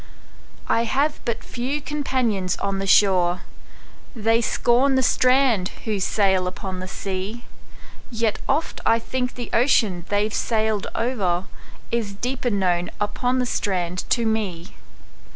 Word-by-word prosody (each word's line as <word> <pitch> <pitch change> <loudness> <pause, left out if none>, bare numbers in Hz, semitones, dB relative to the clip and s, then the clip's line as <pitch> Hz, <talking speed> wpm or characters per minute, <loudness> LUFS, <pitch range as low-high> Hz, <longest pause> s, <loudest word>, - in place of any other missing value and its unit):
I 230 - +2
have 285 +5 0
but 235 -2 -2
few 260 +5 -3
companions 255 -10 -1
on 195 -1 -2
the 195 - -3
shore:They 200 +4 +1
scorn 245 +4 +2
the 260 - +3
strand 250 -7 +3 0.2
who 215 -3 -1
sail 190 -1 +2
upon 185 0 -5
the 185 - -5
sea; 195 +5 -5 0.7
Yet 230 -3 -1
oft 300 +4 0
I 225 - +4
think 250 +2 -3
the 240 -1 -6
ocean 215 -8 +3
they've 205 +1 +1
sailed 220 -3 0
o'erIs 205 0 -3
deeper 250 +1 -1
known 180 -4 +1
upon 245 +5 0
the 250 - +1
strand 180 -6 -2
to 235 -2 +2
me. 205 -5 -2
220 Hz, 125 wpm, -23 LUFS, 190-245 Hz, 0.7 s, I